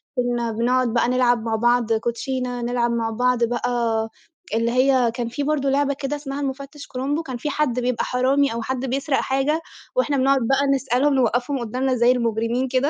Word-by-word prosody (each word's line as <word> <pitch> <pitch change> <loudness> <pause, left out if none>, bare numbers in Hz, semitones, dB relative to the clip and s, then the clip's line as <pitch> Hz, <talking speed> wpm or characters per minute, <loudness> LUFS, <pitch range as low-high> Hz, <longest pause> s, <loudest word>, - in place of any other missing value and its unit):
كُنَّا 240 -2 0
بنقعد 240 +1 +1
بقى 235 0 +2
نلعب 245 -2 +2
مع 225 -1 -1
بعض 240 0 +2
كوتشينا، 245 +2 -2
نلعب 240 0 0
مع 230 -1 -1
بعض 245 +1 +1
بقى 240 +1 0 0.8
اللي 230 +1 +1
هي 255 -1 +3
كان 235 0 -3
في 285 +5 -3
برضه 280 -2 0
لعبة 280 +1 +2
كده 275 +1 -3
اسمها 285 -1 -5
المُفتش 275 +1 -5
كرومبو، 280 +5 -2
كان 260 -5 -5
في 300 - -3
حد 275 -4 0
بيبقى 250 -1 0
حرامي 260 +1 +2
أو 235 - -3
حد 260 +3 -3
بيسرق 270 +2 0
حاجة، 270 +4 0 0.3
وإحنا 295 - +1
بنقعد 270 +1 +3
بقى 275 +2 +2
نسألهم 270 +2 +1
نوقّفهم 250 +2 +1
قدّامنا 255 +3 -1
زي 240 +1 +4
المجرمين 235 +1 0
كده، 260 +3 +1
255 Hz, 180 wpm, -22 LUFS, 240-275 Hz, 0.8 s, زي